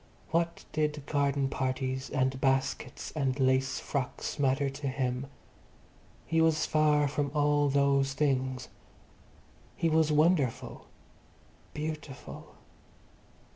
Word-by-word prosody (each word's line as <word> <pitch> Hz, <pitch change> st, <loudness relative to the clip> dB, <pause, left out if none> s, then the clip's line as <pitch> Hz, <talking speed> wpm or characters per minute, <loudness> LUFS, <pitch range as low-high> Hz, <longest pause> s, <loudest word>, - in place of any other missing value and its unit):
What 170 Hz, +1 st, 0 dB
did 150 Hz, -2 st, -1 dB
garden 140 Hz, -2 st, +1 dB
parties 130 Hz, 0 st, -2 dB
and 130 Hz, -1 st, 0 dB
baskets 135 Hz, 0 st, -1 dB
and 135 Hz, -3 st, -1 dB
lace 130 Hz, 0 st, +2 dB
frocks 140 Hz, +1 st, -3 dB
matter 140 Hz, 0 st, +2 dB
to 135 Hz, +1 st, -4 dB
him? 130 Hz, 0 st, -2 dB, 1.0 s
He 165 Hz, 0 st, +2 dB
was 160 Hz, -1 st, +3 dB
far 150 Hz, -1 st, +3 dB
from 145 Hz, 0 st, -1 dB
all 145 Hz, -1 st, +3 dB
those 140 Hz, -1 st, +2 dB
things. 130 Hz, -3 st, 0 dB, 1.1 s
He 165 Hz, -, +1 dB
was 160 Hz, -1 st, +3 dB
wonderful, 150 Hz, -4 st, +1 dB, 0.9 s
beautiful. 150 Hz, -2 st, -7 dB
140 Hz, 100 wpm, -30 LUFS, 130-150 Hz, 1.1 s, was